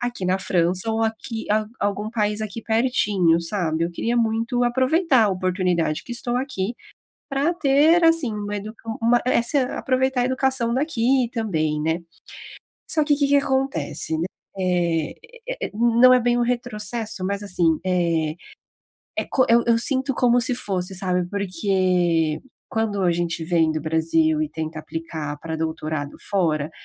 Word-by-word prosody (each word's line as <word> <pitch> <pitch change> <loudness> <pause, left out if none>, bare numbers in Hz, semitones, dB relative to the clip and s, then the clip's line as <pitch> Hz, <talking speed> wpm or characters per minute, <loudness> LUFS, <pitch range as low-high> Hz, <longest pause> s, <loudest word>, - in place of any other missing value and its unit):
Aqui 240 -6 -3
na 185 +1 +1
França 180 +4 +1
ou 225 0 0
aqui 225 +1 -3
a 215 0 +2
algum 205 +1 -2
país 210 -2 -1
aqui 215 +1 -5
pertinho, 210 -8 +2
sabe, 165 -2 -1
eu 170 - -3
queria 230 +7 -2
muito 230 +2 +1
aproveitar 260 +1 +3
a - - +2
oportunidade 180 -4 0
que 240 - -7
estou 240 0 -2
aqui, 240 -5 -3 0.5
pra 280 +5 +1
ter, 315 +2 +4
assim, 325 -8 +4
uma 210 0 -4
edu 210 +2 -6 0.3
uma 240 +1 +4
essa 255 +2 +2
aproveitar 260 0 0
a - - +1
educação 260 -2 +1
daqui 260 -3 +1
também, 155 -10 -1
né. 160 +2 0 0.9
Só 310 - +3
que, 295 -1 +3
o - - -6
que 285 - +2
que 285 - +4
acontece, 270 -9 -1
né, 165 - -1 0.3
eh 175 -4 0 0.3
eh - - -3
eh, - - -11
não 235 +2 +5
é 250 - +4
bem 240 0 +1
um - - +2
retrocesso, 235 -4 -2
mas, 200 +2 -2
assim, 170 -5 +1
eh, 170 -4 0 0.8
é - - 0
co 260 - +2
eu 235 0 +5
eu 230 -1 +4
sinto 265 +2 +2
como 245 0 +3
se 250 0 +2
fosse, 190 -4 -2
sabe, 180 -1 0
porque 180 -4 0 0.3
quando 220 -3 -1
a 175 - +3
gente 170 -1 -2
vem 165 -1 +2
do 155 -1 -3
Brasil 160 -1 +1
e 155 - 0
tenta 155 0 -5
aplicar 155 -2 -6
pra 160 -1 -5
doutorado 155 -2 -3
fora, 160 -6 0
210 Hz, 165 wpm, -22 LUFS, 170-245 Hz, 0.9 s, não